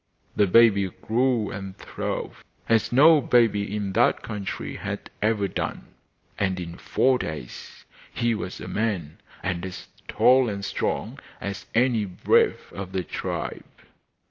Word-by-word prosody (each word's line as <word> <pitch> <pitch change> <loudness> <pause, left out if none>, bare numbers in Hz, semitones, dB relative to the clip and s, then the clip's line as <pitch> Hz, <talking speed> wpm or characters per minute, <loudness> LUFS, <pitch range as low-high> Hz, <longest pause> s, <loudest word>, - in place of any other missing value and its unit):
The 105 - +4
baby 100 -1 +5
grew 115 +1 0
and 95 -2 -7
throve - - -5 0.2
as 115 -1 +2
no 150 +4 +7
baby 105 -5 +2
in 100 -2 -3
that - - +3
country 105 -3 -5
had - - -6
ever 105 -2 +1
done, - - -4 0.5
and 95 -2 0
in 85 -1 -7
four 130 -1 +2
days 75 -6 -7 0.3
he 120 0 0
was 95 -4 -5
a - - -7
man, 95 -9 -2 0.2
and 85 -1 -2
as 95 -1 -7 0.2
tall 130 -1 +4
and 100 -1 -4
strong - - -2 0.2
as 100 -1 -6
any 120 -3 +3
brave 90 -2 +1
of 95 -1 -7
the 95 -1 -1
tribe. - - -4
105 Hz, 140 wpm, -25 LUFS, 95-115 Hz, 0.5 s, no